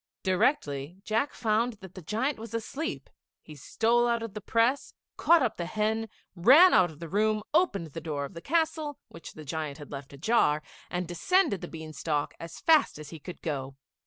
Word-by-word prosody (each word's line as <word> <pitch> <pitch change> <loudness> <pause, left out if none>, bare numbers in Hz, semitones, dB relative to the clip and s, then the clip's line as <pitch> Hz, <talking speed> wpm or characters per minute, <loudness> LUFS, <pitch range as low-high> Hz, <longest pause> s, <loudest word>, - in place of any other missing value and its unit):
Directly 180 - 0
Jack 225 +7 0
found 230 +2 0
that 190 -4 -13
the 185 - -9
giant 225 - -1
was 230 +1 -7
asleep, 280 +9 -4 0.4
he 155 - -11
stole 230 - +1
out 235 -1 0
of 225 -4 -6
the 210 - -6
press, 230 +7 +1 0.2
caught 335 -4 +5
up 230 - -1
the 170 - -3
hen, 220 +3 -1 0.3
ran 275 - +7
out 180 -1 +5
of 155 - -13
the 170 - -6
room, 215 +4 +1
opened 310 - +2
the 165 - -5
door 150 -3 -3
of 140 - -10
the 170 - -8
castle, 315 - 0
which 165 - -11
the 155 - -10
giant 150 0 -4
had 145 -2 -11
left 140 -1 -7
ajar, 150 - +2 0.3
and 180 -1 -3
descended 200 - +1
the - - -5
bean 160 -1 -8
stalk 150 -2 -2
as 165 0 -8
fast 320 - +4
as 150 -1 -10
he 165 - -8
could 180 +4 -10
go. 135 -4 -3
195 Hz, 195 wpm, -28 LUFS, 160-235 Hz, 0.4 s, ran